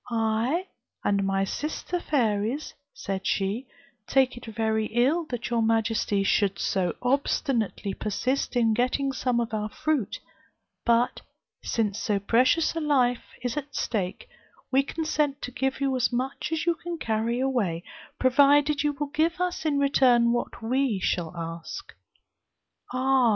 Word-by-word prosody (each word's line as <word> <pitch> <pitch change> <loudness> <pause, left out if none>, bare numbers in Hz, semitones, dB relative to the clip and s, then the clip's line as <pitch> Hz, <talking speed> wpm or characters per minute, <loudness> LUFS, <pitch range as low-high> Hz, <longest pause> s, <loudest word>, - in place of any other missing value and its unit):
'I, 230 +9 0 0.4
and 200 -1 +2
my 195 0 +1
sister 310 - -3
fairies,' 235 -2 0 0.2
said 195 0 -4
she, 205 +7 -1 0.4
'take 265 -2 +3
it 240 - -10
very 220 -1 0
ill 270 +9 +2
that 245 -3 -5
your 235 -1 +2
majesty 220 -2 +1
should 195 0 +2
so 185 -2 0
obstinately 245 -6 0
persist 250 +8 -1
in 230 -2 +3
getting 255 +4 +1
some 250 -2 0
of 230 -1 -2
our 215 0 -1
fruit; 285 -2 -1 0.7
but 235 +1 +2 0.4
since 215 -2 -1
so 210 -2 0
precious 255 - +3
a - - 0
life 260 -6 +2 0.2
is 245 -2 -1
at 290 -1 -5
stake, 190 -5 -2 0.4
we 270 +1 +5
consent 300 -1 -1
to 250 - -4
give 265 +2 -1
you 275 -1 +1
as 255 0 +1
much 260 +5 -2
as 320 -1 -1
you 340 - +3
can 340 +1 -6
carry 230 -2 -1
away, 225 -11 0 0.3
provided 285 +2 +4
you 295 0 +1
will 290 0 -4
give 335 +3 +1
us 360 -2 -1
in 295 -2 +2
return 255 -4 +4
what 240 -1 -3
we 250 -2 +1
shall 175 -3 -1
ask.' 165 0 -6 1.0
'Ah! 260 -1 +3
245 Hz, 145 wpm, -26 LUFS, 220-280 Hz, 1.0 s, we